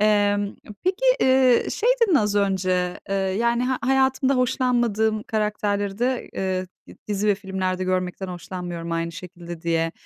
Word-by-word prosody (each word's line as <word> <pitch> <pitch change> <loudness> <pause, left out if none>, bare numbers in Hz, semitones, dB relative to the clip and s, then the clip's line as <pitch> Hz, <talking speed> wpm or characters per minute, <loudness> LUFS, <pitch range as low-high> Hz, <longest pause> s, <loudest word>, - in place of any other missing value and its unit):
Emm, 205 -1 +2 0.3
peki, 380 +7 0 0.2
eee, 260 -2 +4
şey, 465 - 0
dedin, 405 -7 +4
az 210 -7 +2
önce, 185 -3 0
eee, 195 - -1
yani, 225 +5 +1
"Ha 255 0 0
hayatımda 265 +1 +2
hoşlanmadığım 240 -4 +1
karakterleri 205 -2 -1
de, 250 0 -1
eee, 185 -1 -2 0.2
d - - -13
dizi 205 0 -1
ve 205 - +5
filmlerde 190 -2 -3
görmekten 185 0 -2
hoşlanmıyorum 175 -1 -6
aynı 165 0 -2
şekilde," 175 -1 -9
diye. 165 0 0
205 Hz, 145 wpm, -23 LUFS, 185-240 Hz, 0.3 s, ve